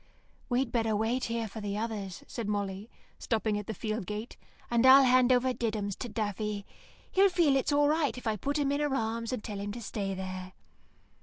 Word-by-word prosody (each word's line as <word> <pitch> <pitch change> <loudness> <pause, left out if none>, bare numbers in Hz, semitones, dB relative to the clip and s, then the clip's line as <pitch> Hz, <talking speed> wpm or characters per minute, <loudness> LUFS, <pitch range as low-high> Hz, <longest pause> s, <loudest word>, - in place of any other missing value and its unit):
"We'd 245 -1 +1
better 225 -2 +1
wait 225 +4 0
here 230 -1 -2
for 215 +2 -8
the 205 0 -3
others," 210 -4 -4
said 230 -3 -5
Molly, 200 +1 -3 0.3
stopping 220 -2 0
at 210 - -8
the 220 - -3
field 215 -1 -3
gate, 210 +3 -5 0.4
"and 235 0 +3
I'll 265 +1 +9
hand 255 0 +5
over 255 +1 +3
Diddums 215 -5 -2
to 245 - -5
Daffy. 210 -1 -3 0.5
He'll 390 +1 +5
feel 340 -6 +3
it's 270 +2 +1
all 290 0 +4
right 300 -3 +1
if 250 - -9
I 220 -1 +1
put 280 +9 -2
him 280 -2 +1
in 285 - 0
her 295 -2 0
arms 230 -1 -2
and 250 -4 -3
tell 205 -3 -5
him 205 +1 -4
to 235 - -7
stay 195 -2 -3
there." 185 0 -6
225 Hz, 210 wpm, -30 LUFS, 205-255 Hz, 0.5 s, I'll